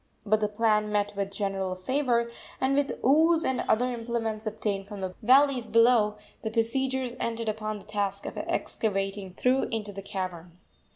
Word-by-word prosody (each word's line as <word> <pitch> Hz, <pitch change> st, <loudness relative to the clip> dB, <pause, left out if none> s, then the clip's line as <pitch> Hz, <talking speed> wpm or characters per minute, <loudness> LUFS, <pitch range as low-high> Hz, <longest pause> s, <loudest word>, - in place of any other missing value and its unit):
But 215 Hz, +1 st, +3 dB
the 210 Hz, -, +1 dB
plan 210 Hz, 0 st, +1 dB
met 205 Hz, 0 st, 0 dB
with 200 Hz, -1 st, -2 dB
general 195 Hz, -2 st, -2 dB
favor, 235 Hz, +3 st, 0 dB, 0.3 s
and, 265 Hz, +1 st, +2 dB
with 285 Hz, -2 st, +1 dB
oos 320 Hz, +5 st, +5 dB
and 260 Hz, -1 st, +1 dB
other 245 Hz, +3 st, +3 dB
implements 230 Hz, -3 st, -3 dB
obtained 205 Hz, -2 st, -2 dB
from 205 Hz, -2 st, -7 dB
the 185 Hz, -1 st, -3 dB
valleys 260 Hz, +1 st, +4 dB
below, 230 Hz, -2 st, +4 dB, 0.2 s
the 220 Hz, -, -2 dB
besiegers 255 Hz, +3 st, 0 dB
entered 230 Hz, -1 st, -2 dB
upon 215 Hz, 0 st, -3 dB
the 200 Hz, -, -13 dB
task 200 Hz, -2 st, -2 dB
of -, -, -5 dB
excavating 195 Hz, -3 st, -2 dB
through 255 Hz, +5 st, +2 dB
into 210 Hz, -3 st, -4 dB
the 195 Hz, -, -6 dB
cavern. 180 Hz, -3 st, -6 dB
215 Hz, 165 wpm, -28 LUFS, 200-245 Hz, 0.3 s, oos